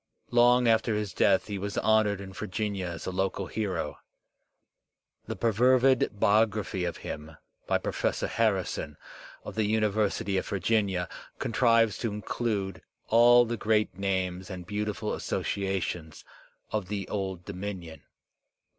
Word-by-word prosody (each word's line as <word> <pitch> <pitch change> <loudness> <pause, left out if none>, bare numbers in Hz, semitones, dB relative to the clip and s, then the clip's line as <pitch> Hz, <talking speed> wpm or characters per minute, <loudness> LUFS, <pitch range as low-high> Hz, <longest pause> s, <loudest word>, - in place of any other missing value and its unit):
Long 120 0 +5
after 115 0 +3
his 105 -2 -2
death 95 -1 +3
he 100 -2 -4
was 100 +1 -4
honoured 110 -2 +3
in 95 -1 -9
Virginia 95 0 -3
as 85 -2 -6
a - - -2
local 95 +1 -1
hero. 95 -6 -3 1.3
The - - -3
perfervid 125 0 +3
biography 105 -3 +2
of 85 - -3
him 75 +1 -7 0.3
by - - +3
Pro - - -3
fessor - - -1
Harrison 95 -9 -1 0.5
of - - -7
the 110 -1 0
University 105 -2 +1
of - - -6
Virginia 100 -3 +1 0.3
contrives 115 -2 +3
to 115 - -1
include 105 -1 -3 0.3
all 120 +1 +7
the 120 0 -3
great 105 -3 +1
names 95 -1 -2
and 90 -3 -7
beautiful 105 +2 -2
associations 90 -5 -3 0.5
of 105 -4 -2
the 100 -1 -3
Old 95 -3 -4
Dominion. 95 -4 -6
100 Hz, 130 wpm, -28 LUFS, 95-110 Hz, 1.3 s, all